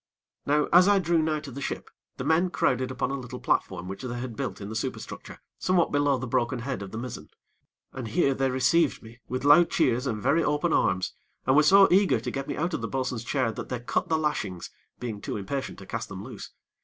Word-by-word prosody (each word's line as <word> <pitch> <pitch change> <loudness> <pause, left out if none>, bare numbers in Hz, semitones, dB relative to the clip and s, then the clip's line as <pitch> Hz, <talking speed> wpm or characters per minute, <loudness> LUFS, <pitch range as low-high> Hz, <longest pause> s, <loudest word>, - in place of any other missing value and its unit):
Now, 150 +1 +3
as 180 +2 +8
I 205 0 +5
drew 170 -3 +2
nigh 155 -1 0
to 145 -3 -9
the 140 +3 -7
ship, - - -4 0.3
the - - -4
men 160 +5 +2
crowded 130 -6 +1
upon - - -2
a 140 - -2
little 125 0 -8
platform 90 -1 -1
which 95 +1 -6
they 120 -2 -4
had 120 -2 -5
built 115 -8 -4
in 100 - -6
the 110 - -6
superstructure 130 +4 -5 0.2
somewhat 185 -2 +2
below 145 -1 +2
the 130 - -4
broken 125 0 0
head 125 -1 -4
of 100 - -6
the 110 - -6
mizzen, 125 +1 -6 0.6
and 130 -3 -5
here 140 +2 +2
they 135 0 0
received 135 +4 +2
me 115 +2 -13
with 130 +1 -3
loud 155 +4 +7
cheers 130 -4 +1
and 110 -4 -2
very 140 +9 +2
open 150 +3 +1
arms, 90 0 +1 0.3
and 130 - +3
were 150 - +7
so 195 +6 +7
eager 195 +1 +4
to - - -4
get 135 0 -4
me - - -4
out 170 +3 -1
of - - -2
the 115 - -2
bo'sun's 130 -3 -2
chair, 125 -2 0
that - - -7
they 125 - -3
cut 120 - -2
the 160 - +2
lashings, 150 - -2 0.3
being 110 -4 -5
too - - -4
impatient 130 +8 -4
to - - -11
cast - - -5
them - - -7
loose. - - -9
130 Hz, 235 wpm, -27 LUFS, 120-155 Hz, 0.6 s, as